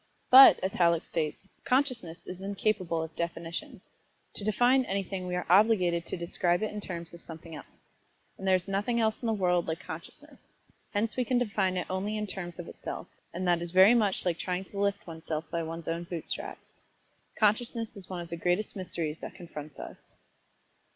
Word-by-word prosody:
But, 265 Hz, +1 st, +11 dB
as 190 Hz, -, -1 dB
Halleck 170 Hz, -2 st, +3 dB
states, 160 Hz, +3 st, -3 dB, 0.2 s
"Consciousness 250 Hz, -, 0 dB
is 185 Hz, +1 st, -7 dB
incapable 195 Hz, -4 st, -1 dB
of 160 Hz, 0 st, -8 dB
definition. 170 Hz, -, -4 dB, 0.5 s
To -, -, -4 dB
define 245 Hz, +6 st, +4 dB
anything 195 Hz, -2 st, -3 dB
we 180 Hz, -, -2 dB
are 180 Hz, -, -2 dB
obliged 180 Hz, -3 st, +4 dB
to -, -, -3 dB
describe 175 Hz, +2 st, 0 dB
it 215 Hz, -, -1 dB
in 210 Hz, -, -4 dB
terms 170 Hz, -4 st, -6 dB
of 170 Hz, -, -11 dB
something 165 Hz, 0 st, -10 dB
else. 150 Hz, -, -9 dB, 0.7 s
And 195 Hz, -, -6 dB
there 190 Hz, -, +6 dB
is 185 Hz, +1 st, -2 dB
nothing 205 Hz, +5 st, 0 dB
else 220 Hz, -1 st, +1 dB
in 240 Hz, -, -2 dB
the -, -, +2 dB
world 180 Hz, -4 st, +1 dB
like 160 Hz, 0 st, -2 dB
consciousness, -, -, -11 dB, 0.4 s
hence 215 Hz, +1 st, 0 dB
we 255 Hz, -, +1 dB
can 250 Hz, +1 st, +1 dB
define 200 Hz, -6 st, +1 dB
it 180 Hz, -, -1 dB
only 195 Hz, +3 st, -2 dB
in 210 Hz, -, -2 dB
terms 180 Hz, -3 st, -5 dB
of 175 Hz, -1 st, -7 dB
itself, -, -, -7 dB, 0.2 s
and 180 Hz, +2 st, -3 dB
that 175 Hz, -1 st, +3 dB
is 175 Hz, -, -4 dB
very 190 Hz, +5 st, +7 dB
much 210 Hz, -6 st, +2 dB
like 175 Hz, -2 st, 0 dB
trying 180 Hz, 0 st, -2 dB
to 200 Hz, +1 st, -8 dB
lift 200 Hz, 0 st, 0 dB
one's 160 Hz, -2 st, -10 dB
self 155 Hz, 0 st, -2 dB
by 170 Hz, -, -1 dB
one's 165 Hz, 0 st, -6 dB
own 170 Hz, +1 st, -2 dB
boot 170 Hz, -2 st, -6 dB
straps. -, -, -5 dB, 0.6 s
Consciousness 225 Hz, +1 st, +1 dB
is 195 Hz, -3 st, -10 dB
one 180 Hz, -2 st, -4 dB
of 170 Hz, -, -8 dB
the 170 Hz, -, -4 dB
greatest 180 Hz, +5 st, 0 dB
mysteries 165 Hz, -5 st, -4 dB
that -, -, -8 dB
confronts 150 Hz, -4 st, -9 dB
us." -, -, -10 dB
185 Hz, 200 wpm, -29 LUFS, 170-210 Hz, 0.7 s, But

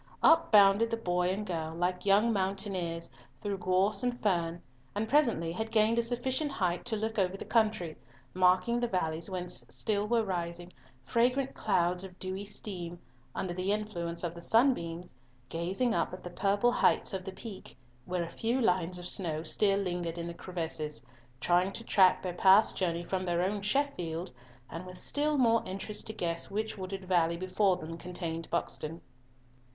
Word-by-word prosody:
Up 330 Hz, 0 st, +5 dB
bounded 205 Hz, +1 st, +6 dB
the 230 Hz, -, -1 dB
boy 180 Hz, -4 st, 0 dB
and 200 Hz, +3 st, -2 dB
girl, 160 Hz, -4 st, -3 dB
like 180 Hz, +2 st, -1 dB
young 210 Hz, +4 st, +4 dB
mountaineers, 190 Hz, -4 st, -2 dB, 0.3 s
through 200 Hz, -2 st, -3 dB
gorse 185 Hz, +5 st, +1 dB
and 245 Hz, -1 st, -1 dB
fern, 170 Hz, -4 st, 0 dB, 0.4 s
and 215 Hz, +2 st, -1 dB
presently 230 Hz, -, +2 dB
had 220 Hz, +6 st, -3 dB
gained 225 Hz, +1 st, +3 dB
a -, -, +5 dB
sufficient 255 Hz, +5 st, -1 dB
height 180 Hz, -3 st, -1 dB
to 235 Hz, -, 0 dB
look 220 Hz, 0 st, -2 dB
over 190 Hz, 0 st, +1 dB
the -, -, -7 dB
country, 215 Hz, -8 st, +1 dB, 0.4 s
marking 185 Hz, +6 st, +3 dB
the 240 Hz, -, 0 dB
valleys 165 Hz, -4 st, -2 dB
whence 180 Hz, -1 st, -3 dB
still 210 Hz, -1 st, -1 dB
were 230 Hz, 0 st, +2 dB
rising 175 Hz, -2 st, -4 dB, 0.3 s
"fragrant 250 Hz, +3 st, +1 dB
clouds 180 Hz, -3 st, +1 dB
of 185 Hz, -1 st, -10 dB
dewy 190 Hz, +1 st, -4 dB
steam" 180 Hz, -4 st, -5 dB, 0.4 s
under 180 Hz, -2 st, -2 dB
the 185 Hz, +2 st, -1 dB
influence 175 Hz, -6 st, -2 dB
of 170 Hz, -1 st, -2 dB
the 170 Hz, -, -10 dB
sunbeams, 180 Hz, -, +1 dB, 0.4 s
gazing 190 Hz, +9 st, 0 dB
up -, -, 0 dB
at -, -, -14 dB
the 175 Hz, -, -7 dB
purple 200 Hz, +6 st, +2 dB
heights -, -, +2 dB
of 190 Hz, -1 st, -3 dB
the 190 Hz, -, -6 dB
Peak, 205 Hz, -1 st, -9 dB, 0.3 s
where 180 Hz, -1 st, -1 dB
a 170 Hz, -, -7 dB
few 235 Hz, +3 st, 0 dB
lines 180 Hz, -5 st, +1 dB
of 175 Hz, 0 st, -6 dB
snow 160 Hz, -5 st, +1 dB
still 195 Hz, +4 st, +2 dB
lingered 175 Hz, -3 st, -2 dB
in 170 Hz, -, -4 dB
the 170 Hz, -, -5 dB
crevices, 160 Hz, -5 st, -5 dB, 0.4 s
trying 180 Hz, +7 st, +2 dB
to 230 Hz, -, -6 dB
track 190 Hz, -4 st, +4 dB
their 180 Hz, -2 st, -3 dB
past 190 Hz, +4 st, +5 dB
journey 170 Hz, -2 st, -1 dB
from 185 Hz, +1 st, -2 dB
their 175 Hz, -1 st, 0 dB
own 200 Hz, +2 st, -1 dB
Sheffield, 195 Hz, -, -1 dB, 0.4 s
and 170 Hz, +3 st, -7 dB
with 180 Hz, 0 st, -9 dB
still 295 Hz, +6 st, 0 dB
more 230 Hz, -3 st, +4 dB
interest 195 Hz, +3 st, -4 dB
to 220 Hz, -, -3 dB
guess 170 Hz, -4 st, -2 dB
which 215 Hz, +2 st, -2 dB
wooded 190 Hz, -1 st, -6 dB
valley 170 Hz, -2 st, +2 dB
before 185 Hz, +1 st, +1 dB
them 165 Hz, 0 st, -7 dB
contained 165 Hz, -2 st, -5 dB
Buxton. 165 Hz, -1 st, -3 dB
185 Hz, 175 wpm, -31 LUFS, 175-215 Hz, 0.4 s, bounded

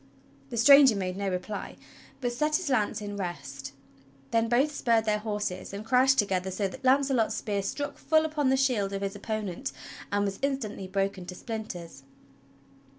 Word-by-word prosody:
The 235 Hz, -, -5 dB
stranger 275 Hz, 0 st, +8 dB
made 185 Hz, -2 st, -2 dB
no 200 Hz, 0 st, -2 dB
reply, 185 Hz, +3 st, -4 dB, 0.5 s
but 245 Hz, -1 st, -1 dB
set 300 Hz, +5 st, +1 dB
his 365 Hz, -3 st, -1 dB
lance 215 Hz, -3 st, +1 dB
in 205 Hz, 0 st, -5 dB
rest. 140 Hz, -8 st, -5 dB, 0.6 s
Then 230 Hz, 0 st, +2 dB
both 260 Hz, +6 st, +3 dB
spurred 230 Hz, -5 st, +2 dB
their 210 Hz, -1 st, +1 dB
horses 205 Hz, -4 st, -4 dB
and 205 Hz, +2 st, -6 dB
crashed 260 Hz, +3 st, +4 dB
together 190 Hz, -3 st, +1 dB
so 195 Hz, +2 st, -1 dB
that 260 Hz, +7 st, -10 dB
Launcelot's 265 Hz, -3 st, +3 dB
spear 205 Hz, -2 st, -2 dB
struck 285 Hz, +9 st, -4 dB
full 315 Hz, 0 st, +3 dB
upon 300 Hz, -3 st, 0 dB
the 265 Hz, -, +3 dB
shield 235 Hz, -7 st, +1 dB
of 195 Hz, 0 st, -3 dB
his 195 Hz, +1 st, -3 dB
opponent 205 Hz, -8 st, -4 dB, 0.4 s
and 205 Hz, 0 st, +1 dB
was 195 Hz, -1 st, -3 dB
instantly 260 Hz, -8 st, -2 dB
broken 195 Hz, -1 st, -2 dB
to 180 Hz, -, -6 dB
splinters. 180 Hz, -, -6 dB
210 Hz, 170 wpm, -28 LUFS, 195-260 Hz, 0.6 s, stranger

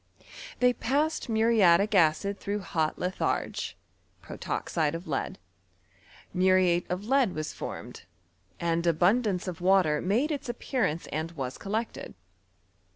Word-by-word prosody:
l^ey 250 Hz, 0 st, +4 dB
passed 295 Hz, +3 st, 0 dB
muriatic 220 Hz, -3 st, +4 dB
acid 195 Hz, +3 st, +3 dB
tbroiigh 205 Hz, +1 st, -2 dB
hot 160 Hz, -4 st, -1 dB
litharge 180 Hz, +1 st, -2 dB, 0.4 s
(protoxide 155 Hz, -2 st, -2 dB
of 170 Hz, +3 st, -7 dB
lead); -, -, -2 dB, 1.0 s
muriate 185 Hz, -1 st, +3 dB
of 185 Hz, +3 st, -3 dB
lead 260 Hz, -5 st, +2 dB
was 155 Hz, 0 st, -4 dB
formed, -, -, -7 dB, 0.5 s
and 170 Hz, 0 st, 0 dB
abnndance 185 Hz, +4 st, +2 dB
of 175 Hz, -2 st, -5 dB
water 180 Hz, -5 st, +3 dB
made 235 Hz, -, +1 dB
its 285 Hz, -4 st, -4 dB
appearance 225 Hz, -, -1 dB
and 160 Hz, +3 st, -3 dB
wa3 130 Hz, -3 st, -5 dB
collected. 220 Hz, +3 st, -4 dB
185 Hz, 115 wpm, -28 LUFS, 170-225 Hz, 1.0 s, l^ey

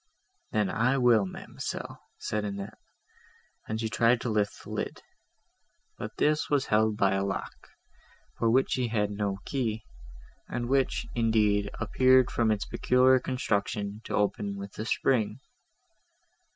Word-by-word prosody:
—"Then 105 Hz, -3 st, +1 dB
I 130 Hz, +4 st, +2 dB
will, 120 Hz, -6 st, +4 dB
ma'amselle," -, -, -6 dB, 0.2 s
said 105 Hz, 0 st, -2 dB
Annette, 100 Hz, -1 st, -6 dB, 0.9 s
and 110 Hz, 0 st, -3 dB
she 110 Hz, -, -1 dB
tried 115 Hz, +2 st, +3 dB
to 120 Hz, -, -2 dB
lift 105 Hz, -1 st, -1 dB
the -, -, -10 dB
lid; -, -, -4 dB, 0.9 s
but -, -, -7 dB
this 150 Hz, +1 st, +1 dB
was 145 Hz, -2 st, +2 dB
held 110 Hz, 0 st, +2 dB
by 100 Hz, -2 st, +3 dB
a 95 Hz, 0 st, 0 dB
lock, 100 Hz, 0 st, -3 dB, 0.9 s
for 115 Hz, -, +2 dB
which 130 Hz, +3 st, +3 dB
she 125 Hz, -2 st, +1 dB
had 105 Hz, -2 st, 0 dB
no 100 Hz, -1 st, -2 dB
key, 115 Hz, -5 st, -2 dB, 0.7 s
and 120 Hz, 0 st, -3 dB
which, 135 Hz, +1 st, +1 dB
indeed, 105 Hz, -3 st, +2 dB
appeared, 130 Hz, +3 st, +4 dB
from 115 Hz, -2 st, +1 dB
its 105 Hz, -2 st, 0 dB
peculiar 130 Hz, +1 st, +4 dB
construction, 105 Hz, -4 st, -2 dB
to -, -, -3 dB
open 100 Hz, -1 st, 0 dB
with 100 Hz, 0 st, -8 dB
a 110 Hz, -, -3 dB
spring. 115 Hz, -2 st, +1 dB
110 Hz, 140 wpm, -28 LUFS, 105-125 Hz, 0.9 s, will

